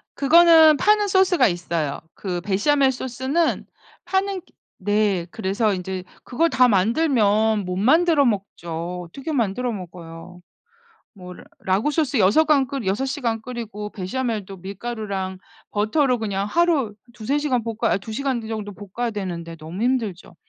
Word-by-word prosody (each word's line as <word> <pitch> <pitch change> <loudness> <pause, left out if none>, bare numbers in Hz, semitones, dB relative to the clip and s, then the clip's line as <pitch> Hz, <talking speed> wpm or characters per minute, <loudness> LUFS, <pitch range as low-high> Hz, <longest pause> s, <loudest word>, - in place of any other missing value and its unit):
그거는 320 +1 +7
파는 420 +4 +3
소스가 375 -7 +4
있어요. 170 -5 -3
그 180 -3 -4
베샤멜 265 +9 +2
소스는 260 +6 -1 0.4
파는 385 0 -1
기 - - -29 0.3
네. 205 -3 +1
그래서 205 +2 0
인제 185 0 -5 0.2
그걸 325 +7 +1
다 255 -5 +4
만들면 220 - +2
못 180 0 -3
만들어 305 - +4
먹죠. 180 -5 -3
어떻게 275 - -7
만들어 245 -1 -1
먹어요? 175 -3 -10 0.8
뭐 180 -2 -10
라 - - -13 0.2
라구 195 +9 +1
소스 295 -3 0
여서간 275 +7 +4
끓 270 -4 -5
6 200 +8 0
시간 240 -5 -2
끓이고 220 -3 -6
베샤멜도 205 -1 -4
밀가루랑 195 -1 -5 0.3
버터로 245 +5 +1
그냥 200 -3 -2
하루 305 -4 +1 0.2
2-3 255 +6 -1
시간 260 -6 0
볶아 230 0 -1
아니 - - +1
2 220 - -9
시간 265 +1 -1
그 220 - -8
정도 215 -2 -5
볶아야 205 +5 -4
되는데 175 -6 -5
너무 165 +5 -8
힘들죠. 225 -8 -2
220 Hz, 295 characters per minute, -22 LUFS, 190-270 Hz, 0.8 s, 그거는